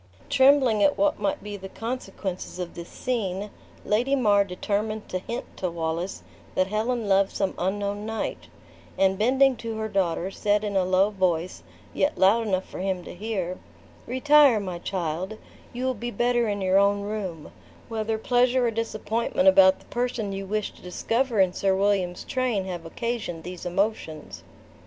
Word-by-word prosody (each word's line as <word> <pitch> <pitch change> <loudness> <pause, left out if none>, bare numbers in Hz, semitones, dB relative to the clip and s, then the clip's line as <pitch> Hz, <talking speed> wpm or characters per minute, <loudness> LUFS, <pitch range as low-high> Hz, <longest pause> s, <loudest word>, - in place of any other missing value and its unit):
Trembling 265 -5 +5
at 285 - +4
what 300 0 +2
might 200 -1 -1
be 205 0 -6
the 190 0 -9
consequences 200 -7 -5
of 180 -1 -5
this 170 0 -8
scene, 205 -5 -3 0.3
Lady 245 +6 +2
mar 205 -6 +4
determined 205 +3 -3
to 185 - -2
hint 235 +6 -5
to 185 - -1
Wallace 165 +2 -3 0.3
that 185 - +3
Helen 220 +3 -1
loved 195 0 +4
some 195 - 0
unknown 200 +2 -1
knight; 225 0 -4 0.5
and 190 0 +2
bending 265 +4 +4
to 225 -1 -5
her 220 0 -2
daughter, 190 -2 0
said 205 +1 +1
in 205 -1 -2
a 190 -1 +3
low 185 +3 +3
voice, 185 -3 -1 0.3
yet 290 - +1
loud 220 +4 +4
enough 190 -2 0
for - - -8
him 185 -1 -2
to - - -9
hear, 185 -2 -3 0.5
"Retire, 275 -1 +5
my 185 -4 -5
child; 180 +3 -3 0.3
you 250 +2 -4
will 260 - +1
be 240 +1 -5
better 240 0 +1
in 205 -1 -2
your 190 +1 +4
own 200 0 +3
room, 200 -7 -5 0.4
whether 220 -1 -2
pleasure 245 +2 +2
or 235 - +1
disappointment 230 +4 -1
about 285 0 +7
the - - -20
person 240 -4 -2
you 195 0 -5
wished 210 +1 -2
to - - -17
discover 230 +6 -1
in 185 -2 +4
Sir 195 0 +1
William's 195 -2 +1
train 245 -7 -1
have 175 -3 -5
occasioned 215 -5 -4
these 180 0 -6
emotions." 165 - -2
205 Hz, 170 wpm, -25 LUFS, 185-235 Hz, 0.5 s, about